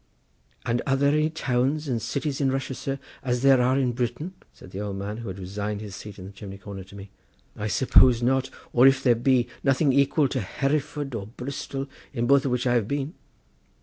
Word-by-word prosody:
"And 120 Hz, 0 st, +1 dB
are 135 Hz, -, +3 dB
there 140 Hz, +1 st, +3 dB
any 155 Hz, +1 st, +2 dB
towns 140 Hz, 0 st, 0 dB
and 120 Hz, -4 st, -1 dB
cities 140 Hz, +4 st, -2 dB
in 135 Hz, -1 st, +2 dB
Russia, 135 Hz, 0 st, -2 dB
sir, 135 Hz, +1 st, -3 dB, 0.2 s
as 125 Hz, -1 st, -1 dB
there 135 Hz, -2 st, +6 dB
are 130 Hz, +2 st, +3 dB
in 130 Hz, -3 st, +2 dB
Britain?" 120 Hz, +8 st, -3 dB, 0.2 s
said 90 Hz, -, -15 dB
the 95 Hz, -, -6 dB
old 100 Hz, -1 st, -3 dB
man, 100 Hz, +2 st, -4 dB
who 115 Hz, -1 st, -7 dB
had 95 Hz, 0 st, -5 dB
resigned 100 Hz, +2 st, -4 dB
his 105 Hz, -2 st, -7 dB
seat 105 Hz, -1 st, -9 dB
in 95 Hz, -, -9 dB
the 95 Hz, -, -9 dB
chimney 100 Hz, 0 st, -9 dB
corner 100 Hz, -1 st, -8 dB
to 100 Hz, -, -14 dB
me; 100 Hz, 0 st, -10 dB, 0.4 s
"I 105 Hz, -, -3 dB
suppose 125 Hz, +1 st, +5 dB
not, 130 Hz, +1 st, +2 dB, 0.2 s
or, 125 Hz, +2 st, +7 dB
if 135 Hz, 0 st, +3 dB
there 125 Hz, -, +5 dB
be, 120 Hz, +1 st, +2 dB, 0.2 s
nothing 135 Hz, +1 st, +3 dB
equal 140 Hz, +2 st, +3 dB
to 130 Hz, -, -1 dB
Hereford 140 Hz, +5 st, -2 dB
or 100 Hz, -4 st, -4 dB
Bristol, 135 Hz, +3 st, -5 dB, 0.3 s
in 120 Hz, -3 st, -1 dB
both 140 Hz, +2 st, +4 dB
of 135 Hz, -, 0 dB
which 125 Hz, 0 st, 0 dB
I 120 Hz, -, +3 dB
have 115 Hz, -4 st, +1 dB
been." 140 Hz, +4 st, -2 dB
125 Hz, 215 wpm, -25 LUFS, 105-135 Hz, 0.4 s, or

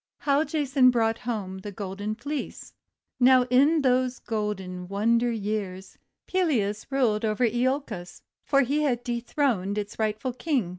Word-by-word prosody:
HOW 285 Hz, +1 st, +2 dB
JASON 280 Hz, -5 st, +3 dB
BROUGHT 225 Hz, -2 st, +1 dB
HOME 205 Hz, -6 st, -4 dB
THE 205 Hz, +2 st, -7 dB
GOLDEN 200 Hz, +2 st, -4 dB
FLEECE 285 Hz, +5 st, -6 dB, 0.5 s
Now, 255 Hz, 0 st, +6 dB
in 285 Hz, +5 st, +4 dB
those 255 Hz, -1 st, +2 dB
golden 190 Hz, -5 st, -4 dB
wonder 230 Hz, +5 st, +1 dB
days, 200 Hz, -3 st, -4 dB, 0.3 s
Pelias 235 Hz, -, 0 dB
ruled 245 Hz, -6 st, +1 dB
over 220 Hz, +2 st, +2 dB
lolcos, 240 Hz, -6 st, -2 dB, 0.2 s
for 275 Hz, -1 st, +3 dB
he 280 Hz, +4 st, +1 dB
had 245 Hz, -5 st, 0 dB
dethroned 235 Hz, -4 st, -1 dB
its 205 Hz, +1 st, -5 dB
rightful 220 Hz, +4 st, -1 dB
King. 255 Hz, -, -1 dB
235 Hz, 135 wpm, -26 LUFS, 210-265 Hz, 0.5 s, Now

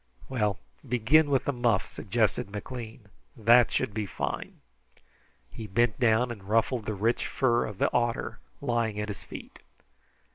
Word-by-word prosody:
"Well, 105 Hz, -7 st, 0 dB, 0.3 s
begin 130 Hz, +6 st, +4 dB
with 135 Hz, -2 st, +2 dB
the 140 Hz, -, 0 dB
muff," 120 Hz, -5 st, +1 dB
suggested 105 Hz, -1 st, -1 dB
McLean. 110 Hz, 0 st, -7 dB, 0.3 s
"That 120 Hz, +2 st, +5 dB
should 105 Hz, -, -1 dB
be 105 Hz, -1 st, -2 dB
fine." -, -, -4 dB, 0.9 s
He 110 Hz, -, -7 dB
bent 115 Hz, +3 st, +1 dB
down 120 Hz, 0 st, +3 dB
and 105 Hz, -5 st, -8 dB
ruffled 115 Hz, +1 st, +1 dB
the 110 Hz, -, -1 dB
rich 115 Hz, +5 st, 0 dB
fur 120 Hz, -3 st, +2 dB
of 105 Hz, -3 st, -8 dB
the -, -, +1 dB
otter 120 Hz, -1 st, 0 dB, 0.2 s
lying 115 Hz, -5 st, 0 dB
at 105 Hz, 0 st, -3 dB
his 100 Hz, -, -6 dB
feet. -, -, -10 dB
115 Hz, 150 wpm, -28 LUFS, 105-120 Hz, 0.9 s, That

